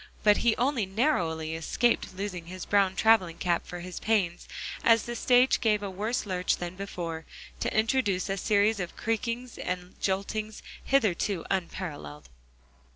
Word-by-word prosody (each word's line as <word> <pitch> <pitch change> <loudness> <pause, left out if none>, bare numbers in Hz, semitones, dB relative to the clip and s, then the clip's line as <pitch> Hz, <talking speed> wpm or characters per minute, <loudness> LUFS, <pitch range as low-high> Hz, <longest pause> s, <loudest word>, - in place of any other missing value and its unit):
But 210 -1 +6
he 235 -2 +3
only 250 -5 +1
narrowly 170 - 0
escaped 185 +6 0
losing 180 -4 -4
his 185 +1 -7
brown 195 -2 +3
traveling 195 -7 +4
cap 175 -1 0
for 175 0 -6
his 180 0 -6
pains, 195 -6 0 0.4
as 230 -1 +5
the 240 - -5
stage 250 +2 +4
gave 210 -3 +2
a 200 - -3
worse 215 +6 -2
lurch 185 -2 0
than 175 0 -5
before, 175 -4 -5 0.4
to - - -1
introduce 220 -5 +1
a 195 0 -2
series 205 +2 +2
of 175 -2 -5
creakings 230 +2 -2
and 180 0 -4
joltings 210 +3 -2 0.2
hitherto 205 -8 +1
unparalleled. 155 - -4
195 Hz, 150 wpm, -28 LUFS, 180-225 Hz, 0.4 s, But